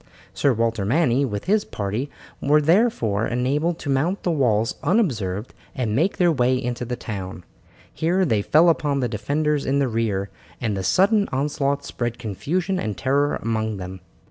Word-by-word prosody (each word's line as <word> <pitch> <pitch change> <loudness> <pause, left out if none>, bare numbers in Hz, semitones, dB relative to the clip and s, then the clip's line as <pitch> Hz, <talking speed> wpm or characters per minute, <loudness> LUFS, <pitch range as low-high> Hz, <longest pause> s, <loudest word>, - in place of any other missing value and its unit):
Sir 140 - +2
Walter 115 -2 0
Manny 135 +3 +2
with 105 -5 -4
his 205 +3 +2
party 105 +7 -3 0.3
were 150 +2 +4
therefore 150 - +2
enabled 145 +7 0
to 145 - -6
mount 160 +9 0
the 175 - +1
walls 115 -7 +1
unobserved 120 - 0 0.2
and 115 -6 -1
make 170 - +1
their 175 -2 +4
way 130 -3 +2
into 125 -1 -3
the 125 +1 -3
town; 95 -6 -6 0.5
here 180 +4 +1
they 110 -9 +1
fell 160 +10 +5
upon 145 -4 +1
the 125 - 0
defenders 145 +7 -1
in 135 - 0
the 140 -1 +2
rear, 110 -4 -1 0.3
and 110 -4 -1
the 95 - -2
sudden 200 - +3
onslaught 140 +1 -1
spread 120 -3 -3
confusion 165 - -2
and 105 - -3
terror 140 +2 +1
among 110 -2 -1
them. 95 0 -7
130 Hz, 170 wpm, -23 LUFS, 110-155 Hz, 0.5 s, fell